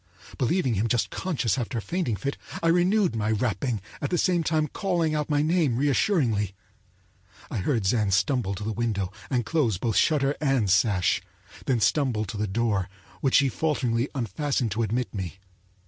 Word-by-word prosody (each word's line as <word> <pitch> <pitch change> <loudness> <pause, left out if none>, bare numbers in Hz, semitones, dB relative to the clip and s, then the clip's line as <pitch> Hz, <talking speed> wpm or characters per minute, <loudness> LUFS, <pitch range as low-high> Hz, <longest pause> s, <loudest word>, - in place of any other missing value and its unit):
Believing 130 0 +1
him 105 +2 0
just 115 0 0
conscious 135 - -1
after 120 0 -3
a - - +1
fainting 165 - -2
fit, 140 +9 -3 0.3
I 165 - +4
renewed 180 - +3
my 110 -1 -1
rapping, 110 0 -1 0.2
at 145 - -1
the 175 - +1
same 175 0 +2
time 155 -1 +1
calling 170 -2 -1
out 150 -1 -1
my 145 -1 +2
name 155 -7 +2
reassuringly. 130 - +1 1.0
I - - -2
heard 115 +2 0
Zann 105 0 +2
stumble 100 +1 +1
to 100 - -6
the 110 +1 -2
window 105 -4 -1 0.2
and 125 -4 0
close 125 - +1
both 110 +2 -1
shutter 145 -3 +3
and 135 -9 +2
sash, 95 -2 +3 0.5
then 125 -3 +2
stumble 125 -5 +2
to 105 - -6
the 105 +1 -1
door, 100 -2 0 0.3
which 135 - +3
he 140 - +4
falteringly 130 -4 0
unfastened 125 - -1
to 110 +4 -1
admit 115 -1 -1
me. 95 -3 -5
120 Hz, 175 wpm, -26 LUFS, 105-150 Hz, 1.0 s, I